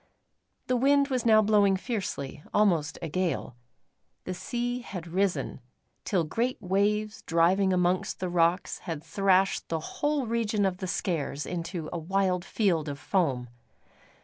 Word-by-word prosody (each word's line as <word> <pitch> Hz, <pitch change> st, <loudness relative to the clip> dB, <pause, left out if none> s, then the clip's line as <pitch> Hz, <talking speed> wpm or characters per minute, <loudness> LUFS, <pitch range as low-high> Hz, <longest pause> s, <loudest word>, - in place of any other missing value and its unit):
The 255 Hz, -, +1 dB
wind 280 Hz, +3 st, +3 dB
was 255 Hz, -3 st, 0 dB
now 215 Hz, -1 st, +6 dB
blowing 205 Hz, -2 st, +4 dB
fiercely, 185 Hz, -, -4 dB
almost 170 Hz, -8 st, +2 dB
a -, -, -2 dB
gale. 165 Hz, -7 st, -2 dB, 0.7 s
The 185 Hz, -, -4 dB
sea 245 Hz, +6 st, -3 dB
had 185 Hz, -8 st, -7 dB
risen, 175 Hz, -6 st, -1 dB, 0.4 s
till 185 Hz, -5 st, +1 dB
great 235 Hz, +11 st, -1 dB
waves 210 Hz, +3 st, 0 dB
driving 180 Hz, +4 st, +3 dB
amongst 180 Hz, 0 st, +1 dB
the 185 Hz, -, -2 dB
rocks 175 Hz, +1 st, +1 dB
had 160 Hz, -3 st, -5 dB
thrashed 195 Hz, -1 st, +2 dB
the 165 Hz, -, -1 dB
whole 290 Hz, -, -1 dB
region 220 Hz, -3 st, 0 dB
of 185 Hz, -2 st, 0 dB
the 185 Hz, -, -4 dB
Skares 160 Hz, -6 st, -2 dB
into 170 Hz, -1 st, -4 dB
a 170 Hz, -, -2 dB
wild 185 Hz, +1 st, 0 dB
field 175 Hz, -7 st, 0 dB
of 140 Hz, -, -5 dB
foam. 140 Hz, -8 st, 0 dB
185 Hz, 145 wpm, -28 LUFS, 170-215 Hz, 0.7 s, now